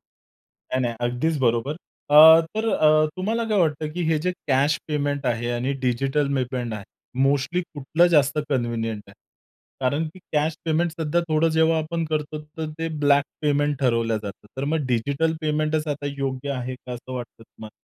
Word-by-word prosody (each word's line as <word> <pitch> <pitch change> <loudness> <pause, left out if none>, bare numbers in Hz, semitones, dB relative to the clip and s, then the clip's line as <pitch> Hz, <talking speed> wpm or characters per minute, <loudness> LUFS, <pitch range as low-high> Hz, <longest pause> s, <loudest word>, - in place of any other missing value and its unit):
नाही, 130 - -9
नाही. 120 -1 -1
अगदीच 125 +7 0
बरोबर. 120 +4 +1 0.4
अ, 160 +2 +10 0.2
तर 225 +1 0
अ, 155 -5 +4
तुम्हाला 225 +5 -1
काय 210 -2 +2
वाटतं 155 -2 +1
की 175 - -3
हे 155 - +2
जे 180 +3 -1 0.2
कॅश 140 +2 +3
पेमेंट 145 -2 -1
आहे 120 0 -1
आणि 125 +3 -1
डिजिटल 135 +3 0
पेमेंट 125 -3 -2
आहे, 105 -2 -7 0.4
मोस्टली 145 +6 +1
कुठलं 155 +4 +2
जास्त 145 +1 +3
कन्व्हिनियंट 115 -4 -1
आहे? - - -15 0.7
कारण 140 +5 0
की 185 - -15
कॅश 155 +1 +1
पेमेंट 165 +1 +1
सध्या 160 +2 +1
थोडं 155 +1 +3
जेव्हा 160 0 +4
आपण 165 +1 -2
करतो 155 0 -2 0.2
तर 160 -1 -2
ते 165 0 -2 0.2
ब्लॅक 140 0 +5 0.2
पेमेंट 145 -1 +1
ठरवलं 115 -3 +1
जातं. 100 +1 -8
तर 135 - -2
मग 150 -2 -1
डिजिटल 140 +7 0
पेमेंटच 155 0 0
आता 145 -1 -3
योग्य 135 0 -3
आहे 130 -1 -4
का 125 0 -10
असं 125 +1 -8
वाटतं 120 -2 -7
तुम्हाला? 110 -1 -12
145 Hz, 170 wpm, -23 LUFS, 125-155 Hz, 0.7 s, अ